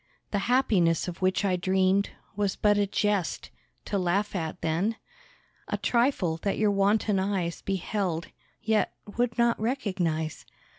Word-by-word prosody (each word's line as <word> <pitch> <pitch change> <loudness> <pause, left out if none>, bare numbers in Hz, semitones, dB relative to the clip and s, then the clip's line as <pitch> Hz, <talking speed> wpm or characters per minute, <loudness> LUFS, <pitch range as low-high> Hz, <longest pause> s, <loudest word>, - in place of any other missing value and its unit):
The 205 - +1
happiness 195 -11 +3
of 175 0 -6
which 185 +2 +2
I 185 -2 +2
dreamed 190 +2 +2 0.3
Was 205 -2 0
but 205 -1 +3
a 205 0 +2
jest, 200 -3 -1 0.3
to 200 - -1
laugh 195 +3 0
at 165 0 -3
then? 175 +8 0 0.7
A - - -1
trifle, 235 - +1
that 195 +4 -2
your 210 -1 +3
wanton 200 0 +2
eyes 190 -3 -1
Beheld, 190 -3 -2 0.3
yet 220 -1 +1 0.2
would 240 -1 0
not 235 0 +3
recognise. 185 - -1
195 Hz, 140 wpm, -27 LUFS, 180-210 Hz, 0.7 s, happiness